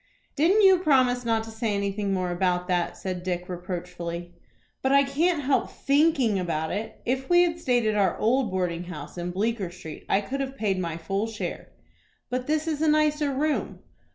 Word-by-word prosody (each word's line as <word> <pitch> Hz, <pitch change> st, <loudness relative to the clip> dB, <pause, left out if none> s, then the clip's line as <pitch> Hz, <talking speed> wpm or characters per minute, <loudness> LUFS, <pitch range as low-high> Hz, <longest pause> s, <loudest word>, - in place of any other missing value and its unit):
"Didn't 365 Hz, +8 st, +4 dB
you 380 Hz, -2 st, +7 dB
promise 255 Hz, -7 st, +3 dB
not 225 Hz, -1 st, +1 dB
to 225 Hz, -, -9 dB
say 220 Hz, -2 st, -1 dB
anything 200 Hz, 0 st, -1 dB
more 185 Hz, -2 st, -1 dB
about 180 Hz, 0 st, 0 dB
that?" 175 Hz, -2 st, 0 dB
said 185 Hz, -2 st, -4 dB
Dick, 180 Hz, -1 st, -3 dB
reproachfully. 175 Hz, -1 st, -5 dB, 0.5 s
"But 265 Hz, -, +1 dB
I 280 Hz, 0 st, +6 dB
can't 295 Hz, +3 st, +1 dB
help 270 Hz, +1 st, +1 dB
thinking 275 Hz, -7 st, +2 dB
about 160 Hz, -3 st, -2 dB
it. 215 Hz, +2 st, -4 dB
If 265 Hz, +2 st, -1 dB
we 350 Hz, 0 st, +6 dB
had 340 Hz, -1 st, -1 dB
stayed 245 Hz, -6 st, +1 dB
at 215 Hz, -, +2 dB
our 195 Hz, -4 st, +2 dB
old 245 Hz, +1 st, +2 dB
boarding 180 Hz, -2 st, -2 dB
house 150 Hz, -5 st, -8 dB
in 175 Hz, 0 st, -4 dB
Bleecker 200 Hz, +1 st, -1 dB
Street, 170 Hz, -3 st, -10 dB
I 195 Hz, -, +3 dB
could 270 Hz, +7 st, -4 dB
have 270 Hz, 0 st, -4 dB
paid 200 Hz, -5 st, 0 dB
my 170 Hz, -3 st, -3 dB
full 195 Hz, +6 st, -2 dB
share." 225 Hz, -2 st, -5 dB, 0.6 s
"But 250 Hz, 0 st, -2 dB
this 310 Hz, +1 st, 0 dB
is 310 Hz, -2 st, -1 dB
a 320 Hz, -, +3 dB
nicer 300 Hz, -1 st, +2 dB
room." 295 Hz, +3 st, -1 dB
220 Hz, 190 wpm, -26 LUFS, 180-275 Hz, 0.6 s, you